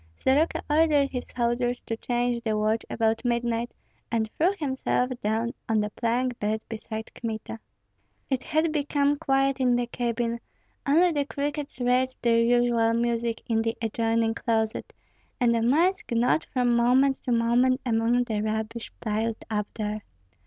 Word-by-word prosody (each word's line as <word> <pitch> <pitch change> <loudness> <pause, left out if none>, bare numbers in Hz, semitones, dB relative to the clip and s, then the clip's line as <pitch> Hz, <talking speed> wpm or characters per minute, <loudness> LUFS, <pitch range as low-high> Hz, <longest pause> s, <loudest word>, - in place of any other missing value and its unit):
Soroka 290 +5 +2
ordered 295 -2 +3
his 250 -2 -4
soldiers 240 0 -1
to 225 - -3
change 240 0 -1
the 215 -2 0
watch 215 +1 +1
about 225 0 0
midnight, 235 -1 0 0.4
and 220 -2 0
threw 345 +4 +2
himself 265 -4 -1
down 225 +3 -1 0.2
on 220 -1 +3
the 210 0 -1
plank 240 +2 -1
bed 215 +1 -1
beside 220 0 -6
Kmita. 220 - -5 0.7
It 265 -2 -1
had 315 +3 0
become 290 -1 +1
quiet 270 0 +1
in 250 -2 +3
the 245 0 +1
cabin; 235 -1 -2 0.5
only 340 +5 +5
the 290 -3 0
crickets 290 -1 -4
raised 255 +1 +1
their 230 -1 +4
usual 235 -1 +3
music 235 -1 -1
in 225 -1 +1
the 225 0 -2
adjoining 225 0 0
closet, 220 -2 -1 0.5
and 240 -2 +3
the 230 - +1
mice 335 +11 +2
gnawed 240 +6 +2
from 245 -2 +1
moment 260 +3 +4
to 250 - -4
moment 240 +2 +3
among 235 +1 +2
the 220 -4 -2
rubbish 220 +1 -3
piled 220 0 -2
up 210 -1 -1
there. 215 -1 -3
235 Hz, 150 wpm, -26 LUFS, 225-260 Hz, 0.7 s, only